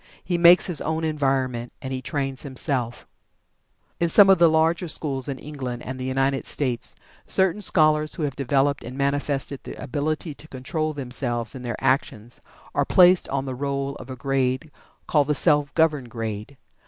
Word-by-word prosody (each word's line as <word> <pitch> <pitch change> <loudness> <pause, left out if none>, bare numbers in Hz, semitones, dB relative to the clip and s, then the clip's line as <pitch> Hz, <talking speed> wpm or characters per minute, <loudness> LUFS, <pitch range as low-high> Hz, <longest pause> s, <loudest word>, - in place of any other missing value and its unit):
He 180 - -1
makes 170 +1 +7
his 175 -6 +1
own 160 +1 -2
environment, 135 -6 -1
and 130 -1 -5
he 130 - -3
trains 135 -1 -3
himself. 130 -3 -2 0.9
In 170 - +1
some 195 +3 +7
of 190 - +4
the 170 -1 +6
larger 165 +3 +2
schools 140 -4 -2
in 140 -2 -4
England 130 -5 -6
and 130 0 -6
the 130 - -4
United 135 +1 0
States, 125 -5 -3 0.3
certain 190 +2 +1
scholars 155 -5 +2
who 165 - -4
have 140 -3 -2
developed 140 +1 +1
and 125 +3 -8
manifested 140 0 -1
the - - -9
ability 155 +4 -3
to 150 - -14
control 155 +4 -3
themselves 125 -4 -3
and 130 - -8
their 120 -2 -4
actions 120 -3 -1 0.3
are - - +2
placed 180 0 +5
on 135 0 -2
the 130 - -4
roll 140 +1 -2
of 130 - -11
a 130 - -5
grade 130 +2 -1 0.3
called 145 -3 +2
the 150 - +1
"Self 145 -1 +2
governed 150 -6 +2
grade." 110 +3 -6
140 Hz, 175 wpm, -24 LUFS, 130-155 Hz, 0.9 s, makes